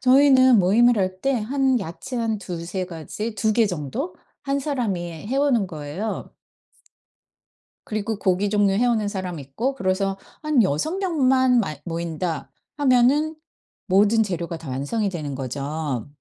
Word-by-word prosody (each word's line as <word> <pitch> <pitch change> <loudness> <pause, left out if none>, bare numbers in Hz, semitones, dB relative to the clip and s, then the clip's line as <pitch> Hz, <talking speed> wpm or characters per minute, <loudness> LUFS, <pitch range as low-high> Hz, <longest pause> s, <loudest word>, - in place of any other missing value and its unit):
저희는 260 -2 +6
모임을 225 +5 +4
할 185 0 -1
때 275 - +2
한 260 +2 +1
야채 190 +8 -6
한 225 -2 0
2-3 180 0 -4
가지 185 +6 -5
2 215 0 +1
개 230 -2 +4
정도 180 - -4 0.3
1 280 0 0
사람이 240 - -1 0.3
해 265 - -1
오는 260 -8 +2
거예요. 160 +6 -5 1.6
그리고 215 0 -3
고기 190 +2 +1
종류 205 -2 +3
해 235 +5 +2
오는 220 -4 +1
사람 185 -5 -4
있고 220 - -3
그래서 195 -1 0 0.2
한 300 -6 +3
'6 250 - -1
명만 260 -9 +3
마 155 -8 -3
모인다.' 170 0 -3 0.3
하면은 285 +4 +3 0.5
모든 205 +4 +4
재료가 170 -3 -4
다 160 - -10
완성이 170 - -1
되는 150 -7 -4
거죠. 140 0 -3
205 Hz, 245 characters per minute, -23 LUFS, 175-255 Hz, 1.6 s, 저희는